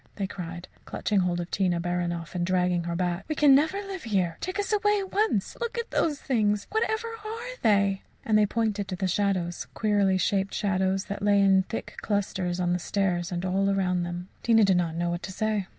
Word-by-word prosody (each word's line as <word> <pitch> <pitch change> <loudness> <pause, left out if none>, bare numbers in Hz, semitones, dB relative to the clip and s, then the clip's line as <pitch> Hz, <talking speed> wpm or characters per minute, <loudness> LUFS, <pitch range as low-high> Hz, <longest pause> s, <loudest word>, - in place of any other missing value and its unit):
they 200 - -2
cried, 175 -2 -7 0.2
clutching 210 -2 -1
hold 180 -1 0
of 175 0 -5
Tina 180 -3 +1
Baranoff 175 -1 -2
and 175 -1 -1
dragging 180 -1 +1
her 170 0 -2
back, 175 +1 -1
"we 310 - -2
can 290 -2 +6
never 310 +7 +3
live 390 -2 -6
here. 185 -7 0
Take 370 +2 -3
us 410 +1 -1
away 415 0 +3
at 385 -1 -5
once. 405 - +1
Look 470 0 -3
at 470 0 -3
those 295 -4 +1
things. 210 -5 +1
Whatever 440 +1 0 0.2
are 455 +3 -6
they?" 200 -2 +3 0.2
And 220 - +2
they 210 -1 +5
pointed 215 -3 -1
to 190 - -3
the 190 +1 -1
shadows 185 -2 -1
queerly 205 -3 +2
shaped 195 +1 0
shadows 190 -1 0
that 200 0 -5
lay 205 0 +4
in 195 -1 +5
thick 225 - -5
clusters 190 -3 -1
on 175 -1 +1
the 180 - 0
stairs 180 -2 -1
and 175 +1 -2
all 195 +2 +1
around 185 -2 +1
them. 175 +1 -4
Tina 225 -2 +4
did 190 -2 +4
not 170 -2 0
know 170 +1 -1
what 175 0 -3
to - - -6
say. 210 -1 -1
195 Hz, 215 wpm, -27 LUFS, 180-220 Hz, 0.2 s, can